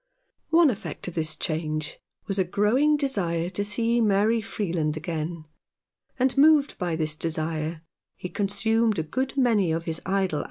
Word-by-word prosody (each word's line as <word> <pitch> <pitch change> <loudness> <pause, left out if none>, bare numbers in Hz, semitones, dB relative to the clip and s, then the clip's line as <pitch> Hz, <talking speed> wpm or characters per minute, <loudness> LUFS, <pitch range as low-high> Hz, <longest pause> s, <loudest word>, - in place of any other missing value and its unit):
One 325 -3 +5
effect 220 -3 -6
of - - -11
this 155 -2 -2
change 155 -1 -3 0.3
was 195 -1 -2
a - - +4
growing 235 - +2
desire 180 - -1
to 200 +2 -2
see 230 +3 +1
Mary 215 +2 +3
Freeland 170 -8 -2
again; 160 0 -4 0.7
and, 260 0 +2
moved 295 0 +5
by 175 -4 -1
this 155 -1 0
desire, 160 0 -3 0.3
he - - -6
consumed 210 +3 +1
a 160 - 0
good 260 - -3
many 220 -9 +3
of 165 +1 -1
his 165 -1 -4
idle - - -13
203 195 +1 +1
Rough 190 - 0
Justice. 150 - -1
195 Hz, 170 wpm, -25 LUFS, 160-230 Hz, 0.7 s, One